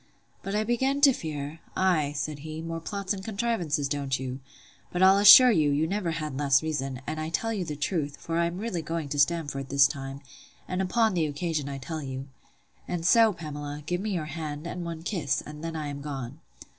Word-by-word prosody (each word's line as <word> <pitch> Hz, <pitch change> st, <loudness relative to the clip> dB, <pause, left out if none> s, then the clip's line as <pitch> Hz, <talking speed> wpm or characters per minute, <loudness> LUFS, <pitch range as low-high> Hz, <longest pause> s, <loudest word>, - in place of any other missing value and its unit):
But 195 Hz, +1 st, -4 dB
I 215 Hz, -, +2 dB
begin 265 Hz, +5 st, +1 dB
to 280 Hz, -2 st, +7 dB
fear—Ay, 155 Hz, 0 st, -2 dB
said 145 Hz, +1 st, -3 dB
he, 155 Hz, +2 st, -7 dB
more 165 Hz, 0 st, -4 dB
plots 200 Hz, +3 st, -3 dB
and 190 Hz, -1 st, -7 dB
contrivances, 195 Hz, -10 st, -1 dB
don't 140 Hz, -2 st, -1 dB
you?—But 135 Hz, +7 st, -6 dB
I'll 190 Hz, +1 st, +7 dB
assure 225 Hz, +5 st, +10 dB
you, 155 Hz, -8 st, +3 dB
you 145 Hz, +2 st, +2 dB
never 190 Hz, +1 st, -1 dB
had 155 Hz, -4 st, -3 dB
less 140 Hz, -1 st, +3 dB
reason; 135 Hz, -5 st, -3 dB
and 155 Hz, -, -4 dB
I 155 Hz, 0 st, -3 dB
tell 225 Hz, +7 st, -1 dB
you 200 Hz, -4 st, -2 dB
the 155 Hz, -3 st, -5 dB
truth; 145 Hz, -1 st, -2 dB
for 165 Hz, 0 st, -2 dB
I 170 Hz, -, +3 dB
am 170 Hz, +1 st, -5 dB
really 200 Hz, -4 st, -3 dB
going 160 Hz, -1 st, -4 dB
to 145 Hz, +1 st, -2 dB
Stamford 145 Hz, -3 st, 0 dB
this 140 Hz, 0 st, +6 dB
time; 135 Hz, 0 st, -4 dB, 0.5 s
and 185 Hz, +1 st, -1 dB
upon 220 Hz, +3 st, +2 dB
the 165 Hz, -3 st, +1 dB
occasion 150 Hz, -1 st, -2 dB
I 140 Hz, -, -5 dB
tell 155 Hz, +4 st, -5 dB
you. 135 Hz, -1 st, -6 dB, 0.6 s
And 170 Hz, -2 st, -3 dB
so, 225 Hz, +4 st, +6 dB
Pamela, 150 Hz, -4 st, -6 dB
give 180 Hz, +2 st, -1 dB
me 215 Hz, -, -2 dB
your 175 Hz, -6 st, -2 dB
hand, 150 Hz, 0 st, -5 dB
and 175 Hz, +1 st, -5 dB
one 165 Hz, -1 st, -6 dB
kiss; 165 Hz, -8 st, -1 dB
and 150 Hz, +1 st, -9 dB
then 165 Hz, 0 st, -4 dB
I 155 Hz, -1 st, -3 dB
am 140 Hz, -1 st, -5 dB
gone. 140 Hz, -1 st, -6 dB
160 Hz, 205 wpm, -27 LUFS, 145-185 Hz, 0.6 s, assure